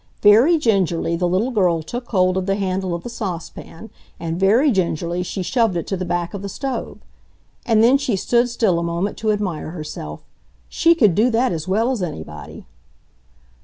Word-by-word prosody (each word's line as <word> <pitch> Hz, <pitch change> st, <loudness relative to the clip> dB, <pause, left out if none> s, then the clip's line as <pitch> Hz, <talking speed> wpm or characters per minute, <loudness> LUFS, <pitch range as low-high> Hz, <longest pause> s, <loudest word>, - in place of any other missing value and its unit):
Very 230 Hz, +11 st, +6 dB
gingerly 190 Hz, -, +1 dB
the 175 Hz, +1 st, 0 dB
little 190 Hz, +9 st, 0 dB
girl 180 Hz, -8 st, +1 dB
took 240 Hz, +9 st, -6 dB
hold 185 Hz, -3 st, +2 dB
of 190 Hz, 0 st, -2 dB
the 195 Hz, -, +1 dB
handle 190 Hz, -2 st, -2 dB
of 170 Hz, -, -7 dB
the -, -, -6 dB
saucepan, 195 Hz, -2 st, -7 dB, 0.3 s
and 165 Hz, 0 st, -4 dB
very 230 Hz, +10 st, +4 dB
gingerly 175 Hz, -3 st, -1 dB
she 185 Hz, +1 st, -4 dB
shoved 225 Hz, -3 st, +1 dB
it 170 Hz, -, -3 dB
to 195 Hz, -, -2 dB
the 185 Hz, 0 st, -4 dB
back 175 Hz, +1 st, -2 dB
of 200 Hz, -, -5 dB
the 200 Hz, -, -5 dB
stove. 270 Hz, +5 st, -4 dB, 0.7 s
And 225 Hz, -2 st, +4 dB
then 255 Hz, +4 st, +5 dB
she 260 Hz, -6 st, -1 dB
stood 240 Hz, +5 st, +1 dB
still 220 Hz, -7 st, +1 dB
a -, -, -2 dB
moment 170 Hz, +4 st, -2 dB
to 220 Hz, -1 st, 0 dB
admire 195 Hz, -8 st, -3 dB
herself. 155 Hz, -2 st, -7 dB, 0.5 s
She 335 Hz, 0 st, +3 dB
could 215 Hz, -, +4 dB
do 220 Hz, +7 st, +3 dB
that 245 Hz, +2 st, +1 dB
as 160 Hz, -1 st, -4 dB
well 220 Hz, +7 st, +1 dB
as 245 Hz, -6 st, -2 dB
anybody! 80 Hz, -, -7 dB
195 Hz, 190 wpm, -20 LUFS, 175-230 Hz, 0.7 s, Very